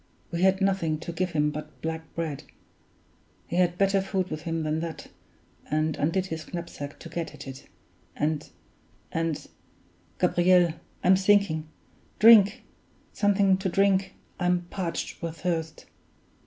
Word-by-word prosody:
We 170 0 -2
had 190 +1 +4
nothing 190 -5 +1
to 170 - -5
give 180 +1 -2
him 150 -1 +2
but 150 +1 -8
black 160 0 -2
bread. 160 -4 -3 1.0
He 170 - -4
had 175 -1 +2
better 195 0 +3
food 190 -2 -2
with 155 0 -4
him 165 -1 -2
than 155 +1 -1
that, 165 -1 -6 0.6
and 155 +1 +1
undid 165 +6 0
his 160 -4 -6
knapsack 170 -5 -6
to - - -8
get 165 0 -5
at - - -10
it, 135 0 -9 0.5
and 150 0 -1 0.6
and 165 -2 -2 0.7
Gabriel! 175 -1 +4 0.3
I'm 185 +1 +6
sinking 190 -5 +3 0.5
drink! 215 -2 +7 0.5
something 200 -2 +3
to 190 0 -2
drink 195 0 +2 0.2
I'm 180 -1 +2
parched 180 -4 -4
with 165 -1 -5
thirst." 165 -3 -2
170 Hz, 140 wpm, -27 LUFS, 160-190 Hz, 1.0 s, drink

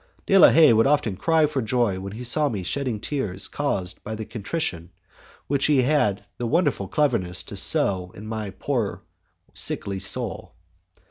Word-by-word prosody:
De 195 - +2
la 195 - +8
Haye 155 -7 +6
would 115 +3 +3
often 140 -9 +1
cry 160 - +2
for 140 -2 -2
joy 110 -4 0
when 100 +1 -7
he 120 +3 -7
saw 145 +5 +2
me 100 -7 -4
shedding 125 +3 -3
tears 105 -7 -3
caused 95 -11 -3
by 110 - -5
the 110 0 -6
contrition 100 - -4 0.6
which 140 -1 0
he 140 -4 +3
had 125 -8 +1
had - - -29
the 120 - -2
wonderful 145 - 0
cleverness 105 -10 0
to - - -10
sow 90 -2 +4
in 105 - -10
my 110 -2 -5
poor 100 -5 -3 0.5
sickly 100 -1 -1
soul. 95 - -3
115 Hz, 175 wpm, -23 LUFS, 100-145 Hz, 0.6 s, la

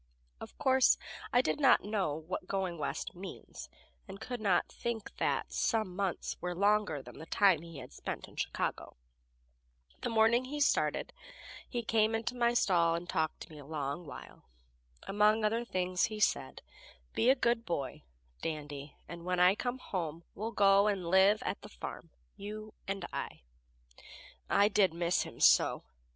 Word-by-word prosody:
Of - - -10
course, 265 -3 +4 0.3
I 245 - +5
did - - -1
not 275 -3 +5
know 200 -8 -1
what 165 +3 -5
going 190 -4 -2
West 145 - -3
means, 185 +2 -9 0.4
and 195 0 -9
could 245 -1 -5
not 195 -4 +2
think 230 -3 -5
that - - -1
"some 215 -6 0
months" 195 -2 -3
were 180 0 -3
longer 200 -6 +2
than - - -12
the 160 - -9
time 190 -6 +4
he 165 -2 -10
had - - -10
spent - - -5
in - - -17
Chicago. - - -3 1.0
The - - -2
morning 230 +2 +4
he 295 +3 -5
started 290 - +1 0.6
he 240 -2 -3
came 220 0 +2
into 225 +2 -2
my 240 -1 +2
stall 170 -7 +3
and 170 +1 -5
talked 160 -3 -1
to - - -10
me 155 - -10
a 145 - -11
long 150 +2 -4
while. 140 - -11 0.6
Among 210 +2 +3
other 225 +3 +1
things 185 -5 0
he 215 -1 -5
said: 65 - 0 0.5
"Be 235 - +3
a 265 - +7
good 235 -2 +1
boy, 140 - -3 0.4
Dandy, 145 -2 -5
and 170 0 -8
when 180 0 -1
I 180 +1 +6
come 245 +4 -3
home 170 -8 -4
we'll 220 +3 -4
go 200 -1 +5
and 195 -4 0
live 195 +3 +5
at - - -3
the - - -11
farm - - -8 0.3
you 215 +1 -7
and 195 -2 -3
I." - - -5 1.1
I 200 - +5
did 195 -5 +3
miss 170 +1 +1
him - - -7
so! - - +5
195 Hz, 165 wpm, -32 LUFS, 170-220 Hz, 1.1 s, a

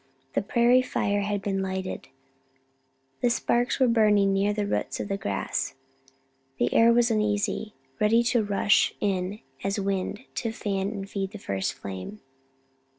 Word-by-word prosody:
The - - +1
prairie 240 +4 +4
fire 205 -5 0
had 205 -1 -2
been 195 -1 -1
lighted; 190 0 -4 1.1
the 245 - +3
sparks 240 +2 +1
were 260 - +5
burning 210 -4 +4
near 195 +1 +2
the 210 0 -1
roots 200 - -2
of - - -4
the 195 - 0
grass; 100 - -2 0.8
the 120 - +1
air 230 +1 +6
was 235 0 +3
uneasy 210 0 0 0.2
ready 225 +3 +4
to 235 -1 +2
rush 205 0 +2
in 195 +1 -1 0.2
as 195 +1 -1
wind, 195 +1 -2 0.2
to 230 - -2
fan 195 -3 -2
and 200 -2 -5
feed 195 0 -4
the - - -6
first 95 - -2
flame. 100 - -7
205 Hz, 155 wpm, -26 LUFS, 195-220 Hz, 1.1 s, air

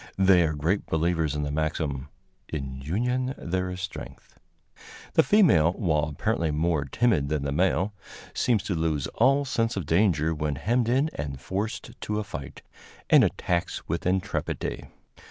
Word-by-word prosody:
They 95 -2 +5
are 80 - -2
great 80 +8 0
believers 80 -2 0
in 75 - -1
the 70 - -2
maxim, 75 -3 -2 0.4
"In 65 -3 -5
union 125 - -1
there 90 +1 -2
is 90 0 -5
strength." 95 -1 -8 0.7
The - - +6
female, 115 - +4
while 80 -8 +1
apparently 80 +2 -1
more 75 0 0
timid 85 - +1
than 75 -2 -1
the 70 - -2
male, 95 +5 +1 0.4
seems 115 -5 +1
to 100 - -2
lose 80 -4 0
all 135 +4 +3
sense 115 -4 0
of 95 - -2
danger 80 -2 +2
when 75 -2 -2
hemmed 115 - +1
in 135 +6 +2
and 70 -2 -5
forced 100 - -4
to 105 - -2
a 105 - -1
fight, 70 -10 -8 0.5
and - - +8
attacks 85 -1 -1
with 85 +2 -2
intrepidity. 95 0 -2
85 Hz, 155 wpm, -26 LUFS, 75-105 Hz, 0.7 s, and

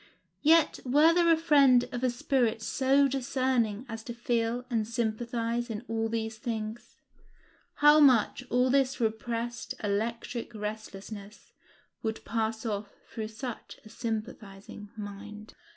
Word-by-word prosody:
Yet 320 +1 +4
were 295 +6 +5
there 340 -1 +4
a 325 - +5
friend 280 -6 +5
of 245 0 -4
a 255 - +3
spirit 240 -2 0
so 275 +3 +3
discerning 255 -4 0
as 225 -1 -7
to 235 - -6
feel 235 0 -1
and 225 -4 -1
sympathize 235 +1 -2
in 225 +2 -5
all 225 0 -1
these 220 -1 -3
things, 220 0 -5 0.8
how 295 +1 +6
much 255 -6 +4
of 250 +1 +2
this 270 -1 +2
repressed 230 +1 -2
electric 230 +3 -3
restlessness 210 -1 -7 0.5
would 220 -1 -4
pass 225 0 -2
off 205 -2 -3 0.2
through 220 -1 -4
such 225 +2 -7
a - - -12
sympathizing 215 -3 -6
mind. 210 +1 -8
230 Hz, 130 wpm, -29 LUFS, 220-255 Hz, 0.8 s, how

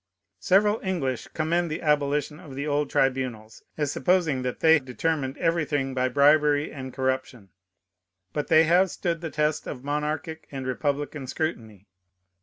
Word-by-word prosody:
Several 205 +3 +3
English 145 - -2
commend 170 +2 -1
the 155 - -4
abolition 150 0 +1
of 135 -3 -11
the 140 +2 -3
old 145 -1 0
tribunals, 125 -5 -1 0.2
as 150 -2 0
supposing 175 -8 +1
that 125 -1 -3
they 160 -1 +6
determined 135 +1 -2
everything 150 -5 0
by 130 0 +1
bribery 145 +2 +4
and 130 -2 -7
corruption. 130 -5 -3 0.8
But 150 - -2
they 160 0 +6
have 180 +4 +4
stood 170 -2 -3
the 165 - -4
test 150 0 -1
of 125 -2 -6
monarchic 150 +2 -3
and 135 -2 -5
republican 145 +1 -2
scrutiny. 115 - -4
145 Hz, 145 wpm, -26 LUFS, 130-160 Hz, 0.8 s, they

